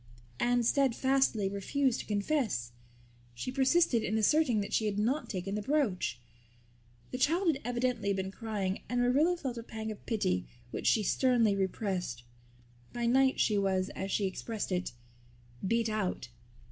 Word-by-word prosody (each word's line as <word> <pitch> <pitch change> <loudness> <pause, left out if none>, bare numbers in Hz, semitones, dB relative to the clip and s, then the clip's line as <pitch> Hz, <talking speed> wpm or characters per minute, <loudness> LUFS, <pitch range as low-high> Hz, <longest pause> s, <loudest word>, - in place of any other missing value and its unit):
Anne 245 0 +2
steadfastly 265 -4 +2
refused 230 +7 0
to - - -7
confess. 205 - -1 0.6
She 190 - -4
persisted 265 -1 +3
in 215 - 0
asserting 245 +1 +3
that 200 - -5
she 220 - +2
had 205 -1 -2
not 250 +9 0
taken 195 -1 -3
the 210 - -1
brooch. 210 - 0 0.9
The 255 - -4
child 340 +7 +2
had 280 -3 0
evidently 245 -4 0
been 190 -1 -2
crying 200 -3 -3
and 245 +1 0
Marilla 285 +9 +3
felt 255 -7 -4
a - - -7
pang 220 -1 -5
of 210 - -10
pity 90 - 0 0.2
which - - -3
she 220 - +4
sternly 235 -2 +3
repressed. 190 - -2 0.7
By 240 -1 -2
night 265 +2 +3
she 210 -2 +3
was, 190 -1 0
as 190 +1 -5
she 200 - +1
expressed 205 +2 -4
it, 180 -6 -1 0.7
"beat 230 +2 +1
out." 210 - -2
225 Hz, 155 wpm, -31 LUFS, 195-260 Hz, 0.9 s, she